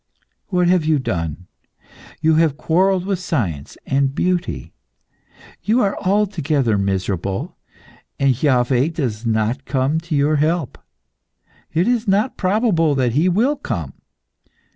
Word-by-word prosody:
What 180 -3 +1
have 180 -2 +3
you 155 -1 +2
done? 85 - -3 0.8
You 160 0 +3
have 155 -3 +2
quarrelled 185 +3 +1
with 195 -2 -1
science 100 - -3
and 135 0 0
beauty. 180 -1 -2 0.9
You 230 +4 +2
are 200 -1 +1
altogether 165 - +1
miserable, 95 -1 -2 0.6
and 135 -1 +3
Iaveh 130 +2 +2
does 120 -7 -3
not 110 +4 0
come 135 +3 0
to 165 -1 -4
your 145 +2 +2
help. 155 -1 -1 0.9
It 170 +5 +1
is 240 -2 +1
not 205 +6 +1
probable 185 -6 +1
that 125 -3 +1
he 160 +7 +3
will 235 +11 +2
come. - - -4
155 Hz, 125 wpm, -20 LUFS, 125-185 Hz, 0.9 s, have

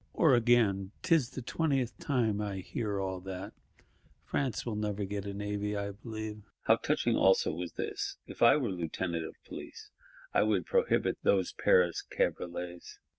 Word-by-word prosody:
Or 160 -5 +5
again: 110 -5 +3
''Tis 160 -8 +3
the 130 - -7
twentieth 135 -4 0
time 115 -7 +1
I 100 -2 -3
hear 100 +2 -3
all 95 -1 -2
that; 95 +2 -7 0.7
France 130 -6 -1
will 115 -3 -2
never 105 -1 -2
get 100 0 -4
a 100 - -4
Navy, 105 0 -2
I 100 0 -2
believe.' 110 0 -6 0.2
How - - +5
touching - - +1
also 485 -1 +4
was - - -5
this: 410 -2 -3
'If - - -11
I - - +7
were 125 -8 -1
Lieutenant 85 -1 -2
of - - -11
Police, 440 -2 -9 0.4
I - - +4
would - - +2
prohibit 480 -1 +1
those 485 - +2
Paris 480 -1 +3
cabriolets. 90 - -3
105 Hz, 160 wpm, -31 LUFS, 100-135 Hz, 0.7 s, I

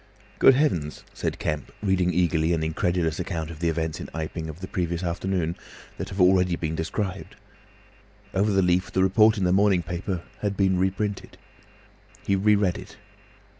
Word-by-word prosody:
"Good 135 - +7
Heavens!" 90 - 0
said - - -3
Kemp, 75 -1 -3
reading 95 -3 +2
eagerly 85 -1 +2
an 80 -1 0
incredulous 80 0 0
account 80 -2 -3
of 80 - -10
the 85 0 +1
events 80 -1 -2
in - - -7
Iping, 80 0 -4
of 80 +2 -8
the 95 - -6
previous 85 -1 -2
afternoon, 85 -1 -1 0.4
that - - -4
have 95 - -7
already 90 -1 +4
been 80 -2 -3
described. 90 +4 -4 1.0
Over 100 +3 +2
the 95 -2 +3
leaf 90 +1 +1
the 95 - +2
report 110 +3 +4
in 100 - -1
the 90 0 +3
morning 95 -2 +3
paper 90 0 -4 0.2
had 100 -1 -2
been 95 -2 +2
reprinted. 95 +2 -2 0.9
He 100 - +2
re 105 +2 +4
read 100 -4 +1
it. - - -12
90 Hz, 170 wpm, -25 LUFS, 85-95 Hz, 1.0 s, Good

